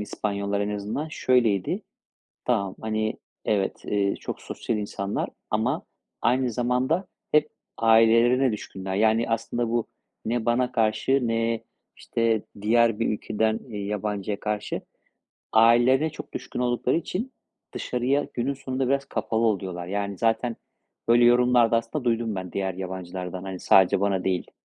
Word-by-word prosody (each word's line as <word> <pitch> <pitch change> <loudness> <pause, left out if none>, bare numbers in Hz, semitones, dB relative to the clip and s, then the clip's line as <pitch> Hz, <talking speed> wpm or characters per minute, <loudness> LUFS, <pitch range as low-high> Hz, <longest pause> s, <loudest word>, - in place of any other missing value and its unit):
İspanyollar 100 -1 -2
en 100 - -1
azından 110 +10 -3
şöyleydi, 120 -10 +1 0.6
tamam, 100 -6 0
hani, 110 0 -1 0.3
evet, 100 -3 0
eee, 100 -1 +1
çok - - -6
sosyal 115 - -3
insanlar 100 -1 -3 0.2
ama - - 0 0.4
aynı 125 +1 +2
zamanda 125 - 0 0.2
hep 150 0 +4 0.3
ailelerine 115 +3 +5
düşkünler. 95 -2 -5
Yani, 110 +3 +3
aslında 115 +1 -1
bu 120 -1 0 0.4
ne 115 0 -1
bana 125 +1 +2
karşı 120 +3 +1
ne, 115 0 0 0.3
işte, 115 -2 0 0.2
diğer 115 0 +3
bir 115 - +1
ülkeden, 110 +1 0
eee, 105 -3 -5
yabancıya 105 -1 -2
karşı. 105 -1 -3 0.7
Ailelerine 120 +7 +5
çok - - -10
düşkün - - -5
oldukları 125 +2 +1
için 195 +9 -3 0.4
dışarıya 130 +4 0
günün 130 +3 -1
sonunda 130 -1 -2
biraz 140 +1 +1
kapalı 115 -3 -1
oluyorlar. 95 -4 -2
Yani, 100 0 -3
zaten, 115 +1 +1 0.5
böyle, 120 +1 +6
yorumlarda 120 -1 +5
aslında 115 +4 -2
duydum 115 -2 0
ben 95 -2 -5
diğer 95 -2 -2
yabancılardan. 90 -1 -5
Hani, 95 -1 -6
sadece 95 -1 +5
bana 100 -2 +1
değil. 90 -2 -1
115 Hz, 135 wpm, -25 LUFS, 100-125 Hz, 0.7 s, böyle